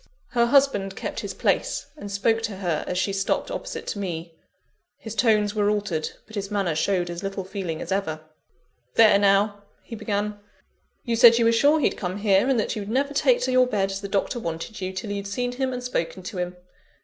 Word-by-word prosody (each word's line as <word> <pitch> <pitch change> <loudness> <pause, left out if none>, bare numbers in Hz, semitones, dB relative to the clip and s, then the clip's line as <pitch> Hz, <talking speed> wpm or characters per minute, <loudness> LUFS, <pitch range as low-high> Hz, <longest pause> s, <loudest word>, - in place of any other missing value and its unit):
Her 235 -1 +2
husband 235 -8 +3
kept - - -4
his - - -5
place, - - 0
and 205 -10 -8
spoke 225 +3 +1
to 220 -3 -3
her 175 -5 -1
as 180 - -2
she 195 +2 0
stopped 195 0 -1
opposite - - -5
to 205 - -4
me. 170 -3 -4 0.6
His 220 - -8
tones 210 -2 +2
were 205 -1 +2
altered, 205 -7 -1 0.2
but 220 - -17
his 200 -2 -4
manner 200 -5 0
showed 175 +3 0
as 170 0 -6
little 195 0 -4
feeling 185 -4 -4
as - - -8
ever. 160 -5 -1 0.7
"There 215 -3 +7
now!" 200 +1 +3 0.2
he 230 - -8
began, 205 -1 -2 0.6
"you 235 -2 -1
said 230 0 +8
you 235 - +3
were 230 - +5
sure 285 +7 +4
he'd 290 - +1
come 185 0 -3
here, 200 +3 +3
and 260 -4 +3
that 215 - -1
you'd 205 -1 -5
never 275 +4 0
take - - +3
to - - 0
your 255 0 +5
bed, 195 -5 0
as 195 0 -4
the 200 - -4
Doctor 200 +5 -1
wanted 170 +3 -5
you, 185 0 -2
till 195 +3 -5
you'd 200 0 -4
seen 245 +5 -2
him 260 +1 -2
and 250 -1 -5
spoken 185 -6 -3
to 190 -1 -6
him. 180 0 -3
205 Hz, 215 wpm, -24 LUFS, 195-230 Hz, 0.7 s, said